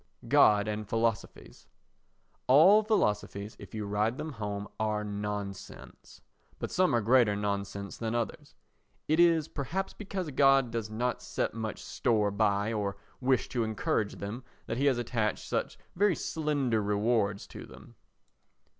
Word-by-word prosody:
God 105 0 +5
and 105 -1 -4
Philosophies 115 -2 -2 0.8
All 170 +11 +7
philosophies, 105 - -1
if - - -11
you 105 -1 -3
ride 105 +4 0
them 155 - -5
home, 105 -4 -5
are 105 -1 0
nonsense; 105 -1 -6 0.4
but - - -5
some 185 -8 +2
are 120 - +2
greater 115 -1 +4
nonsense 100 -1 -3
than 115 0 -3
others. 115 -3 -4 0.5
It 155 +2 +2
is 165 -3 +4
perhaps 170 +8 -3
because 190 -6 -5
God 135 -2 +4
does 115 -2 -3
not 120 +3 -2
set - - -2
much 110 -1 -5
store 105 -4 +1
by 100 +1 +1
or 100 -2 -2 0.2
wish 130 -1 +1
to 120 -2 -1
encourage 110 -1 -1
them 105 +6 -6 0.2
that 115 - -3
he 140 +2 +2
has 130 -3 +3
attached 115 -3 -2
such - - -2 0.2
very 200 0 +3
slender 145 -8 -1
rewards 105 0 0
to - - -9
them. - - -14
110 Hz, 145 wpm, -30 LUFS, 105-135 Hz, 0.8 s, All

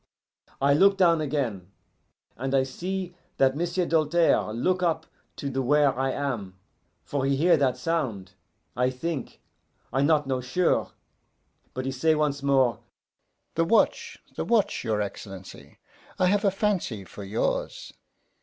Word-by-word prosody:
I 140 +1 +4
look 195 +6 +5
down 170 -4 +4
again, 125 -11 -2 0.7
and 135 +2 -2
I 135 - +4
see 180 +7 -4 0.2
that 135 0 +3
M'sieu' 175 +3 -1
Doltaire 165 -6 +2
look 180 +12 0
up 170 -3 0 0.3
to 140 - -5
the 135 -1 -1
where 145 +1 +3
I 135 +1 0
am, 120 -10 -4 0.5
for 140 -2 -2
he 135 +1 +2
hear 170 +5 +4
that 130 -3 +1
sound, 125 - -2 0.4
I 125 +1 +2
think 140 +2 -5 0.5
I 135 - +2
not 150 0 +3
know 130 -1 -1
sure. 150 +9 0 0.8
But 130 0 -3
he 135 - -1
say 155 +5 +2
once 150 -2 0
more, 130 -5 +2 0.7
'The 165 - +1
watch, 225 +7 +2 0.2
the - - -2
watch, 210 -4 +1
your 110 -3 0
Excellency! 95 -1 -9 0.4
I 185 - +2
have 200 +3 +2
a - - +6
fancy 195 - -1
for 100 +2 -10
yours! 105 +4 -2
140 Hz, 145 wpm, -26 LUFS, 125-170 Hz, 0.8 s, a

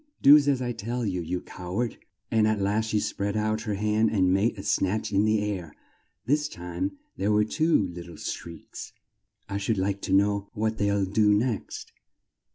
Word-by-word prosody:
"Do 140 +2 +10
as 140 -3 +3
I 120 - -1
tell 120 +2 -3
you, 90 -3 -1
you 90 +2 -3
cow 90 +1 -7
ard!" 120 -1 -1 0.3
and 110 -1 +3
at 110 -1 +1
last 105 +3 0
she 105 - +1
spread 100 0 -2
out 110 0 0
her 105 -2 -2
hand 105 +2 +2
and 95 -3 +2
made 105 +4 +1
a 95 - -7
snatch 100 +2 0
in 100 +2 +3
the 110 -1 +2
air. 95 -7 -4 0.5
This 145 +4 +1
time 90 0 -4 0.2
there 100 +3 +1
were 105 0 +4
two 155 - +2
lit 85 0 -8
tle 85 - -10
shrieks. 85 +1 -7 0.5
"I 100 - -3
should 100 +2 -1
like 100 +1 -1
to - - -4
know 100 +1 +2
what 110 +1 -1
they'll 100 -1 +2
do 105 +2 +3
next! 115 +1 -2
105 Hz, 190 wpm, -26 LUFS, 95-110 Hz, 0.5 s, Do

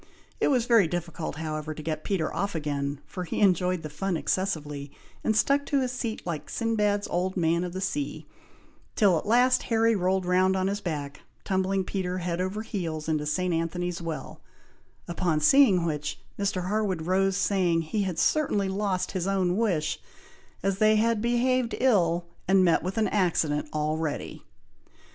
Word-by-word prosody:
It - - +2
was 250 -5 +2
very 230 -7 +5
difficult, 170 -2 -4
however, 155 0 -4
to 155 - -8
get 155 -1 -3
Peter 180 -6 -1
off 200 -2 -2
again, 145 -2 -2
for 180 - -6
he 170 - -4
enjoyed 180 -3 +2
the - - -4
fun 190 +2 -2
excessively, 150 -7 -2 0.3
and 220 -1 +1
stuck 280 +4 +3
to 280 - +2
his 255 -1 -1
seat 235 -3 -4
like 170 -4 -4
Sinbad's 210 -3 0
old 185 +2 -1
man 170 0 +2
of 175 -1 -5
the 190 - -4
sea, 280 +9 -3 0.7
till 200 -5 +4
at - - -10
last 250 +3 +4
Harry 225 0 +3
rolled 185 0 +1
round 185 +1 +3
on 185 0 0
his 200 +1 -1
back, 145 -5 -4 0.2
tumbling 190 0 0
Peter 185 -1 -3
head 175 -1 -2
over 195 +4 -3
heels 165 -8 -4
into 155 -2 0
St. 180 +3 0
Anthony's 175 +1 -2
Well, 160 -4 -6 0.7
upon 170 -2 0
seeing 190 - +5
which, 150 -2 -3 0.2
Mr. 195 -3 -1
Harwood 200 -5 -1
rose, 190 +2 +1
saying, 180 -5 +1
he 205 +7 -2
had 185 -4 -2
certainly 210 - +1
lost 190 -1 -1
his 185 -1 -2
own 185 -2 +1
wish, 185 -9 0 0.6
as 195 0 0
they 215 0 +5
had 225 0 +2
behaved 240 +1 +1
ill, 175 -9 +2 0.2
and 190 0 +5
met 170 - +3
with 185 +4 -4
an 220 - +2
accident 160 -7 +1
already. 155 0 -2
185 Hz, 170 wpm, -27 LUFS, 165-205 Hz, 0.7 s, very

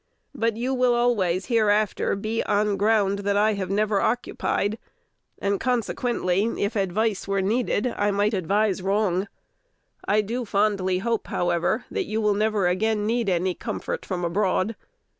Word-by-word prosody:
But 230 -5 -1
you 250 +3 -1
will 250 -1 +3
always 200 -7 +1
hereafter 215 -5 +1
be 215 +3 -2
on 205 0 +1
ground 200 -1 +2
that 200 0 0
I 215 +1 +3
have 190 -2 -3
never 205 0 +1
occupied, 220 -2 -1 0.6
and 200 0 -1
consequently, 235 -5 0 0.2
if 200 +3 -1
advice 200 +2 0
were 195 0 0
needed, 215 +3 0
I 205 0 +1
might 205 +2 +1
advise 195 +1 +1
wrong. 195 -1 0 0.8
I 210 +1 +3
do 235 +5 -3
fondly 200 -3 +1
hope, 230 -2 -1
however, 175 -1 0
that - - -1
you 215 +1 -2
will 210 -1 +2
never 210 -1 +1
again 210 +4 0
need 230 -1 0
any 180 0 +1
comfort - - -5
from 180 -2 -3
abroad. 190 +4 0
205 Hz, 150 wpm, -24 LUFS, 195-220 Hz, 0.8 s, will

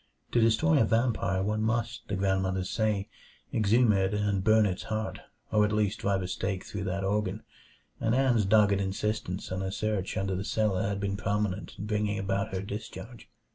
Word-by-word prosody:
To 120 - +3
destroy 110 -8 +4
a - - +5
vampire 110 -4 +1
one 105 +2 0
must, 115 +1 -1
the 100 - -2
grandmothers 95 -1 0
say, 105 -3 0 0.5
exhume 110 +2 +4
it 95 +1 +1
and 100 -2 0
burn 110 +1 +5
its 95 -2 -1
heart, 110 0 -3 0.3
or 105 -1 +4
at 105 - +1
least 105 -1 0
drive 100 -1 0
a - - -3
stake 95 +1 -3
through 100 -1 -5
that 95 +1 -2
organ; 105 +1 -1 0.6
and 115 +1 +1
Ann's 125 -5 +3
dogged 100 -1 +4
insistence 100 -1 -2
on 95 +1 -2
a 95 0 -2
search 110 -3 -2
under 95 -1 -1
the 95 - -2
cellar 105 -3 0
had 100 -1 -2
been 100 0 -2
prominent 105 -1 -2
in 105 - -5
bringing 105 -1 0
about 100 +1 -1
her 95 0 -3
discharge. 110 +3 -8
105 Hz, 185 wpm, -29 LUFS, 95-110 Hz, 0.6 s, a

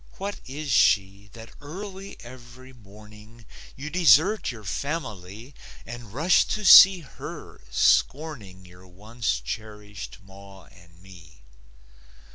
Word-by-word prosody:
What 200 +1 -6
is 145 +2 -6
she 100 -3 +1
That 115 -1 -13
early 190 +6 -9
every 125 +1 -14
morning 105 +1 -17 0.3
You 150 +3 -8
desert 175 - +3
your 115 -4 -9
family 110 - -6 0.3
And 120 -3 -10
rush 160 - +2
to 210 -1 -4
see 190 0 +9
her, 140 - -11
scorning 120 -11 0
Your 90 +1 -17
once 105 - -4
cherished 105 - -9
ma 95 0 -15
and 85 -2 -21
me? 80 -8 -17
115 Hz, 110 wpm, -24 LUFS, 95-145 Hz, 0.3 s, see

